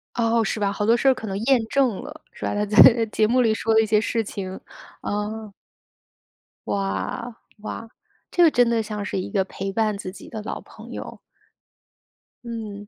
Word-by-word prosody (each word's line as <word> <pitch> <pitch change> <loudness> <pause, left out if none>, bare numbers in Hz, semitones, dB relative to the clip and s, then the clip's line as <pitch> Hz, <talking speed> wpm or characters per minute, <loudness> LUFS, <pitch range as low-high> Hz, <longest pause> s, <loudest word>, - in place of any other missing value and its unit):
哦， 230 -1 +2
是 215 - -2
吧， 200 -1 +1
好 205 +1 -2
多 230 +2 +4
事 270 - +1
儿 265 - +7
可 225 - -7
能 195 -1 -3
验 265 -2 +4
证 260 -7 +1
了， - - -10
是 - - -12
吧。 - - -1
他 205 0 0
在， 210 +1 -3 0.2
呃， 230 -1 0
节 215 0 +2
目 250 +3 +3
里 225 -3 +3
说 225 +1 0
的 220 - +6
一 - - +1
些 215 0 +3
事 225 0 0
情， 190 -2 -6 0.4
呃。 210 +1 -4 1.1
哇， 220 +4 -3 0.3
哇， 225 +1 -6 0.4
这 350 - +4
个 325 - +7
真 245 -3 +4
的 230 -1 +1
像 210 -1 -4
是 200 - -2
一 185 - -5
个 195 -3 +2
陪 195 0 -5
伴 215 0 0
自 185 -2 -6
己 190 - -12
的 220 - -6
老 - - -4
朋 - - -13
友。 - - -7 1.3
嗯， 215 -3 -6
220 Hz, 215 characters per minute, -23 LUFS, 205-230 Hz, 1.3 s, 儿